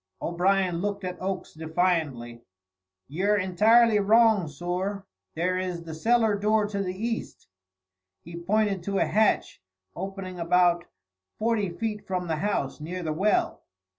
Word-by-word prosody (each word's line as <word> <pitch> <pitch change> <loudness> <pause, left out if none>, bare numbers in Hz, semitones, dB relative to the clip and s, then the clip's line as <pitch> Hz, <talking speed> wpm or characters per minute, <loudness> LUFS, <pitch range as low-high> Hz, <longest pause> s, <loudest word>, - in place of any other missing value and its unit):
O'Brien 180 0 +1
looked 200 0 -3
at 180 -1 -5
Oakes 190 0 -4
defiantly. 160 -8 -1 0.7
"Yer 195 +8 +1
intirely 215 +4 +4
wrong, 215 -2 +4
sorr. 180 +6 -4 0.3
There 180 +3 0
is 180 -2 -4
the 165 -1 -8
cellar 225 +6 +2
door 215 +1 +2
to 200 -1 -2
the 185 -1 -3
east." 230 +3 -4 0.8
He 170 +1 -10
pointed 200 +2 0
to 200 -1 -1
a - - +3
hatch, 215 +1 +1 0.3
opening 190 -1 -6
about 175 0 +3 0.5
forty 215 -3 0
feet 210 +4 -4
from 180 -1 -2
the 160 -2 -2
house, 175 -7 -2
near 180 +4 -5
the 155 -1 -2
well. 200 +7 +1
185 Hz, 135 wpm, -26 LUFS, 170-210 Hz, 0.8 s, intirely